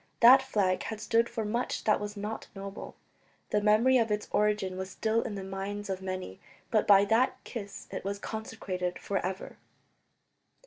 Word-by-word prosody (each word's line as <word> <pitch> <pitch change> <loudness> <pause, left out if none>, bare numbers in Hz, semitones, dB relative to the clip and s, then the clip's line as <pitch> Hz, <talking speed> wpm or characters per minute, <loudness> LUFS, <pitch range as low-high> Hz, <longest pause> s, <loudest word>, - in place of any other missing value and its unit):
That 255 +3 +9
flag 200 -8 +1
had 220 - -4
stood 230 +2 +2
for 225 -2 -3
much 235 +4 -2
that 215 - +3
was 205 0 -5
not 210 +2 -5
noble; 195 0 -7 0.6
the 210 - +2
memory 225 +5 +5
of 225 -1 +1
its 210 0 -1
origin 210 -3 +1
was 190 0 -5
still 220 +4 0
in 220 -3 -4
the 195 - -5
minds 195 +1 -4
of 190 0 -3
many. 185 - -5 0.3
But 215 -2 +2
by 200 0 +7
that 225 +5 +2
kiss 205 -5 -7
it - - -5
was 200 +1 -2
consecrated 195 -4 -4
for 195 - -2
ever. 190 +1 -5
210 Hz, 175 wpm, -30 LUFS, 195-225 Hz, 0.6 s, That